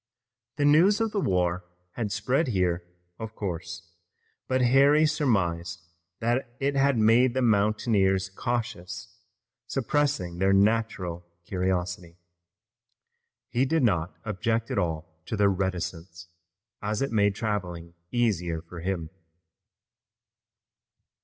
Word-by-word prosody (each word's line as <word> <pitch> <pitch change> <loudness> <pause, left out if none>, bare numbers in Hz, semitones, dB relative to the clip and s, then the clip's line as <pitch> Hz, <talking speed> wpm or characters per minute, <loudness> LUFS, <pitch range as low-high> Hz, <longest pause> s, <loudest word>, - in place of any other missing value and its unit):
The 145 - +1
news 170 +9 +5
of 225 -1 0
the 205 - -1
war 90 - +1 0.3
had 110 -1 -3
spread 135 +9 +1
here, 90 -6 0 0.4
of 110 0 -7
course, 85 -3 -5 0.6
but 130 0 +1
Harry 140 +5 +5
surmised 90 - 0 0.4
that 120 +1 -1
it 140 +1 0
had 135 -1 +3
made 115 +3 +4
the 130 - +1
mountaineers 100 -3 +2
cautious, 105 - -4 0.5
suppressing 135 - -1
their 95 +1 +3
natural 100 -4 +1 0.2
curiosity. 90 -2 -2 1.3
He 120 +3 +1
did 160 +2 +1
not 90 -6 +1
object 115 +3 -1
at 120 - +1
all 80 -2 -4
to 110 - -3
their 100 0 +4
reticence, 90 -3 -4 0.6
as 105 +3 -1
it 135 - -2
made 100 -3 +2
traveling 90 -6 -3 0.2
easier 90 -9 0
for 85 +1 -10
him. 85 -2 -3
100 Hz, 115 wpm, -27 LUFS, 90-120 Hz, 1.3 s, news